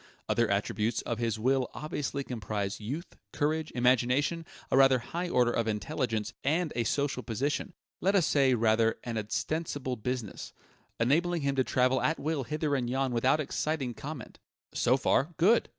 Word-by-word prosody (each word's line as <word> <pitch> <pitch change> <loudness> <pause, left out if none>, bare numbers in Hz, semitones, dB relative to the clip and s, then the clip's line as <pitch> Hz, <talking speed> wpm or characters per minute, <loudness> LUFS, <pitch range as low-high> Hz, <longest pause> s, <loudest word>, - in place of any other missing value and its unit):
Other 120 -1 +2
attributes 105 +3 0
of 120 -2 -3
his 115 -2 0
will 130 +3 +1
obviously 145 -2 -3
comprise 105 -5 -3
youth, 140 - -6
courage, 155 +1 -1
imagination, 130 +7 +2 0.2
a - - +4
rather 135 -1 +6
high 170 +9 -4
order 125 -5 +3
of 115 -1 0
intelligence, 110 0 -2
and 160 +3 +1
a 120 -1 0
social 140 +1 0
position 140 - -2 0.2
let 195 +2 +2
us 180 -5 +4
say, 135 -4 +3
rather, 115 0 +3
an 115 -2 -3
ostensible 130 +5 -2
business 120 -2 -4 0.5
enabling 165 +7 +2
him 140 0 +1
to 130 - +3
travel 130 +1 +2
at 160 - +1
will 150 -2 -1
hither 150 +3 -1
and 125 -3 0
yon 135 +1 0
without 130 +5 +3
exciting 145 -3 -2
comment. 140 +1 -8 0.3
So 125 +2 +3
far, 145 +4 +1
good! 215 +8 +4
130 Hz, 160 wpm, -30 LUFS, 115-150 Hz, 0.5 s, rather